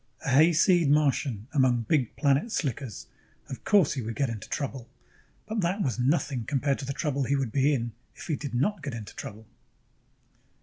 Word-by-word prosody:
] - - -16
A - - -1
hayseed 165 +3 +5
Martian 140 -7 +1
among 130 -5 +3
big 125 0 0
planet 145 - +2
slickers... 135 - -3 0.4
of 130 - -7
course 200 -8 +4
he 135 - -3
would 115 0 -5
get 135 0 0
into 110 -3 -7
trouble. 135 -4 -4 0.6
But 215 0 -2
that 190 +4 0
was 130 -3 -1
nothing 135 -1 +1
compared 140 0 0
to - - -5
the 135 - -3
trouble 140 -2 -1
he 140 - +1
would 135 -5 -1
be 140 +3 +3
in 120 -4 -1 0.2
if - - -10
he 155 - -1
did 140 -3 -6
not 180 +9 0
get 140 -6 -5
into 110 -3 -8
trouble! 110 +2 -8
140 Hz, 190 wpm, -27 LUFS, 125-150 Hz, 0.6 s, hayseed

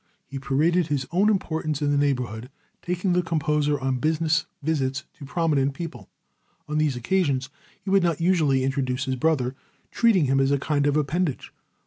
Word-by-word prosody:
He 135 +1 -7
paraded 155 +6 +1
his 145 -3 -1
own 195 +5 +3
importance 160 -7 -1
in 145 -1 0
the - - +2
neighborhood, 125 -4 -1 0.3
taking 180 +1 -1
the 180 - +3
composer 150 -3 0
on 130 -1 -1
business 160 +1 +1 0.2
visits 140 -3 -1 0.2
to 145 - -8
prominent 140 -3 0
people. 165 +1 -7 0.6
On 150 0 -1
these 150 -4 +1
occasions 135 0 0 0.3
he 190 0 -5
would 195 0 +5
not 170 -3 0
usually 160 -7 +2
introduce 130 0 -1
his 130 -1 -1
brother, 130 -2 +1 0.4
treating 215 -9 +3
him 135 0 +2
as 135 0 +3
a 140 - +3
kind 145 0 0
of 145 +1 +2
appendage. 155 0 -1
150 Hz, 170 wpm, -24 LUFS, 135-165 Hz, 0.6 s, would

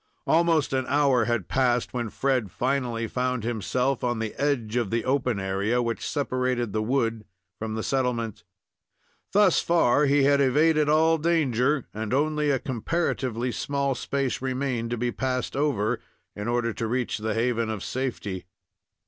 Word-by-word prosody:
Almost 165 -4 +2
an 130 -1 0
hour 140 -4 +3
had 120 -5 -1
passed, 125 -2 +1
when 120 -3 -2
Fred 130 -3 0
finally 125 -1 -1
found 125 0 -2
himself 120 +4 -1
on 120 -1 0
the 110 -1 -3
edge 125 -6 -1
of 120 -5 0
the 115 +1 -1
open 130 -5 +1
area 100 +5 0
which 115 -1 -2
separated 125 -5 -1
the 110 - 0
wood 115 -2 0 0.4
from 110 0 -3
the 110 - -3
settlement. 120 -7 -1 0.9
Thus 200 -3 +4
far 150 -4 +3
he 140 0 +4
had 140 0 +4
evaded 150 +3 +3
all 160 +1 +4
danger 145 -4 +1
and 110 +2 -2
only 150 +1 +1
a 140 - +3
comparatively 130 -3 -2
small 140 +2 -1
space 135 +1 -2
remained 130 -3 -2
to 120 - -2
be 120 +1 -1
passed 130 +1 -2
over 135 -8 0 0.4
in 105 +2 -5
order 120 -1 0
to 115 - -3
reach 125 -1 -1
the 110 0 -2
haven 115 -1 0
of 110 -3 -4
safety. 105 -8 -4
125 Hz, 155 wpm, -26 LUFS, 115-140 Hz, 0.9 s, Thus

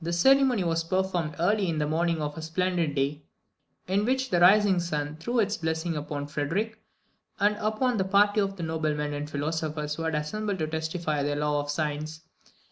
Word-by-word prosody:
This 170 +1 -1
ceremony 265 -2 +5
was 165 -1 0
performed 175 -3 -1
early 195 +3 +2
in 160 - -1
the 150 - +1
morning 165 +1 0
of 150 0 -3
a 160 - -6
splendid 165 -1 -1
day, 140 +2 -1 0.7
in 195 +3 +1
which 260 +2 0
the 175 - +3
rising 195 +1 +6
sun 150 -3 -3
threw 235 +10 -2
its 210 -2 +2
blessing 160 +1 -2
upon 145 -1 -4
Frederick, 165 +10 -2 0.6
and 205 +1 +3
upon 220 +4 0
the 190 - +2
party 205 +2 +3
of 195 0 -2
noblemen 155 -3 -2
and 145 +1 -4
philosophers 150 0 -2
who 165 - -5
had 160 -1 -1
assembled 200 +7 -2
to 160 - -1
testify 160 -1 -2
their 145 +1 0
love 145 0 0
of - - -10
science. 155 +1 -3
165 Hz, 185 wpm, -27 LUFS, 150-195 Hz, 0.7 s, rising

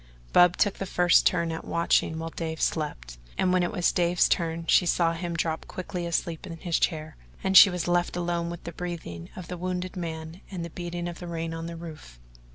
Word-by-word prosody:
Bub 175 0 +6
took 205 - +1
the 195 - -3
first 175 -1 +4
turn 170 -1 +1
at 160 - -5
watching 170 -1 +1
while 165 0 -4
Dave 160 -1 -4
slept, - - -2 0.2
and 185 -1 +2
when 185 - +3
it 175 - 0
was 175 - +2
Dave's 175 0 +3
turn 165 0 -1
she 180 - +4
saw 170 -1 +2
him 170 0 -4
drop 160 -1 -2
quickly 180 -1 -5
asleep 170 +1 -2
in 165 -2 -7
his 170 0 -1
chair, 155 -2 -1 0.3
and 190 0 0
she 195 - +11
was 180 -2 -3
left 175 0 +1
alone 170 -1 -1
with 170 0 -7
the 170 - -6
breathing 165 - -6
of 180 -2 -8
the 180 - -5
wounded 185 +1 -3
man 165 0 -6
and 180 -4 -5
the 170 - -8
beating 175 0 -4
of 175 0 -7
rain 165 -1 -4
on 165 0 -5
the 170 0 -7
roof. 155 - -10
170 Hz, 215 wpm, -27 LUFS, 165-175 Hz, 0.3 s, she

